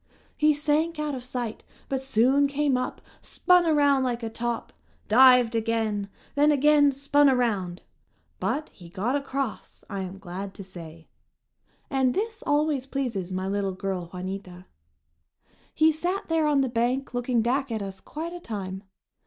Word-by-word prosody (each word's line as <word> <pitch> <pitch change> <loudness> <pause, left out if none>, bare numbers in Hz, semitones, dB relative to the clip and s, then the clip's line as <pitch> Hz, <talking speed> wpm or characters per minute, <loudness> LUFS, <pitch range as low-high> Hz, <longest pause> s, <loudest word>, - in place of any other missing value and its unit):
He 305 0 +4
sank 305 +3 0
out 300 -1 -2
of 255 -2 -5
sight 245 -3 -4 0.2
but 270 -1 -2
soon 265 +2 +3
came 285 -1 +1
up, 255 - -3 0.2
spun 360 -2 +3
around 285 -3 +4
like 245 -2 -1
a 225 - -3
top, 235 0 -3 0.3
dived 250 +1 +6
again, 220 -3 -1 0.2
then 295 +1 +4
again 290 0 +5
spun 280 +1 +3
around. 205 -9 0 0.6
But 305 +1 -2
he 175 -2 -13
got 205 +9 -1
across, 275 -4 -4
I 200 -1 -3
am 190 +1 -6
glad 195 +1 -7
to 195 - -8
say. 165 -3 -11 0.8
And 265 -3 +1
this 445 +1 -2
always 290 -2 +1
pleases 230 -10 -3
my 185 +1 -2
little 195 -1 -1
girl, 185 -2 -4
Juanita. 185 0 -7 1.1
He 315 +1 +4
sat 350 +5 -3
there 325 -2 +2
on 290 -2 +3
the 265 - +1
bank 245 +3 -1
looking 245 -1 0
back 265 +2 0
at 220 -2 -2
us 195 -1 -7
quite 330 +3 -6
a 350 - -6
time. 195 - -5
250 Hz, 155 wpm, -26 LUFS, 200-290 Hz, 1.1 s, dived